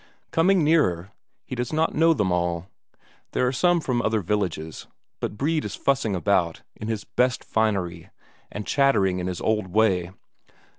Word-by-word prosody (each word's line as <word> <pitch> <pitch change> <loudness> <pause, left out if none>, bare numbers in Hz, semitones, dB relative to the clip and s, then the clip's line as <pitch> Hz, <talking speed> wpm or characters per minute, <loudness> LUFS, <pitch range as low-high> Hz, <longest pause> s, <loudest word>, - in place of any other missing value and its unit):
Coming 180 +1 +3
nearer, 100 - +2 0.3
he - - -8
does 120 -1 -3
not 160 +1 +1
know 165 +2 +4
them 100 -8 0
all; 85 -1 -1 0.7
there 125 - +2
are 125 - +2
some 175 +6 +3
from 125 -6 -1
other 110 -2 +1
villages, 90 -5 -3 0.3
but 105 - -4
Brede 155 +4 0
is - - -5
fussing 130 -7 0
about, 90 -3 0
in 105 - -7
his 110 -2 -2
best 125 +2 0
finery, 95 -7 -1 0.4
and 105 0 -5
chattering 105 -10 +2
in 90 - -3
his 90 -2 -4
old 105 -3 0
way. 95 -3 +2
110 Hz, 160 wpm, -24 LUFS, 90-135 Hz, 0.7 s, know